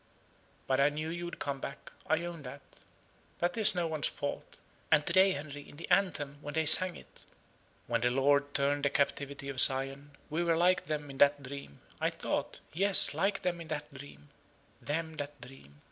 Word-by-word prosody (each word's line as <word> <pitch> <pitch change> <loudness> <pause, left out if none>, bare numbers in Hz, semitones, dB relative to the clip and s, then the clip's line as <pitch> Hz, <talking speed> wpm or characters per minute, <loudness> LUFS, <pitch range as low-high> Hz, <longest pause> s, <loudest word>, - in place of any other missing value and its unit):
But 130 0 0
I 140 +1 +5
knew 155 +2 -5
you 175 +1 -5
would 175 - -7
come 140 -1 -4
back 140 - -8 0.2
I 170 +2 +1
own 170 -2 -7
that. 125 -2 -12 0.6
That 175 +1 -1
is 215 -4 +5
no 175 -1 0
one's 155 -3 -1
fault. 145 0 -6 0.3
And 155 -2 +4
to - - 0
day, 190 0 +5
Henry, 145 0 -8
in - - -15
the 165 - -8
anthem, 145 -8 +1
when 145 +1 -7
they 160 0 +1
sang 180 +3 +6
it, - - -14 0.6
'When 115 -1 -1
the 120 - +2
Lord 140 +2 +2
turned 140 +1 +1
the 140 - +3
captivity 140 0 -2
of 135 -2 -4
Zion, 135 +2 +2
we 160 +3 -2
were 165 -1 +1
like 180 +2 +2
them 150 -3 -4
that 145 0 +4
dream,' 140 - -9 0.2
I - - +1
thought, - - -4
yes, 195 +4 +6
like 195 +1 -1
them 175 -1 -1
that 150 -1 -6
dream 130 - -13 0.5
them 160 +1 -4
that 145 -1 -6
dream. 75 - -14
145 Hz, 190 wpm, -31 LUFS, 140-165 Hz, 0.6 s, sang